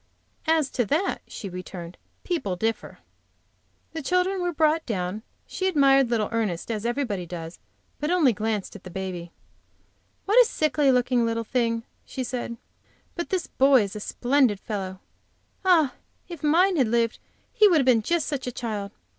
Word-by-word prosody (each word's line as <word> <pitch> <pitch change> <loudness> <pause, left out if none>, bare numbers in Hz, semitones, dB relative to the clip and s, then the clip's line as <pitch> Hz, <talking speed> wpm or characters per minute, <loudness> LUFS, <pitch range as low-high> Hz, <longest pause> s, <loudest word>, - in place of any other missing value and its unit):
"As 315 -3 +2
to 245 - 0
that," 320 - 0
she 205 - -7
returned, 180 -1 -8 0.3
"people 310 - -2
differ." 220 +4 -3 1.0
The 320 - -4
children 365 +4 +1
were 355 0 0
brought 315 0 +2
down. 190 -1 -2 0.2
She 375 - -2
admired 275 -6 +4
little 220 -3 +1
Ernest, 220 -4 -2
as 220 +1 -2
everybody 235 -8 -2
does, 165 -1 -7 0.4
but 300 - -2
only 330 -9 +4
glanced 215 -1 -3
at 205 - -11
the 185 - -9
baby. 180 -2 -5 0.9
"What 430 +5 +6
a - - +5
sickly 300 -3 +2
looking 250 -1 +2
little 230 0 -1
thing!" 230 -1 0 0.2
she 260 - -5
said. 240 -2 -4 0.6
"But 345 - -4
this 370 -4 -1
boy 265 -3 +4
is 200 0 -6
a - - -4
splendid 245 -1 +1
fellow! 190 -3 -5 0.6
Ah, 335 -8 +4 0.3
if 340 -5 -8
mine 345 +5 +3
had 260 -5 +3
lived 230 0 +1 0.3
he 425 - +6
would 350 -5 +4
have 275 - +2
been 245 -3 +5
just 340 +8 0
such 280 -4 -3
a - - -2
child! 215 -4 -4
245 Hz, 165 wpm, -25 LUFS, 210-310 Hz, 1.0 s, What